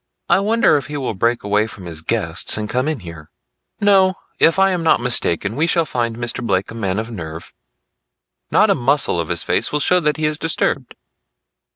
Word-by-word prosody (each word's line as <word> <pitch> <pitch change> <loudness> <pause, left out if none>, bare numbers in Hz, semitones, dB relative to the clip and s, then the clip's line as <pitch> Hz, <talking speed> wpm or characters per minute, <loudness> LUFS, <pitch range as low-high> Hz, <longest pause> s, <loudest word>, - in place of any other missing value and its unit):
"I - - +5
wonder 220 -3 +3
if 140 - -5
he 150 0 -5
will 130 -5 -3
break 115 +5 0
away 105 +2 +1
from 100 -4 -10
his 80 -2 -6
guests - - 0
and 105 0 -3
come 125 +5 -1
in 155 -7 -2
here?" 85 -3 -11 0.5
"No; 190 -2 +4 0.2
if 165 - +4
I 195 0 +4
am 180 -2 -1
not 165 - +3
mistaken 110 -4 +1
we 160 +5 +1
shall 170 -1 +2
find 120 -5 -2
Mr. 120 +1 -4
Blake 95 -4 -1
a - - -8
man 100 -4 -2
of 115 +2 -4
nerve. 80 -5 -8 1.0
Not - - +4
a - - +5
muscle 130 -7 +1
of 85 - -3
his 85 -1 0
face - - 0
will 150 - 0
show 180 +5 +3
that 150 -2 0
he 155 - -1
is 150 0 -1
disturbed." 145 -5 -2
120 Hz, 210 wpm, -19 LUFS, 100-155 Hz, 1.0 s, I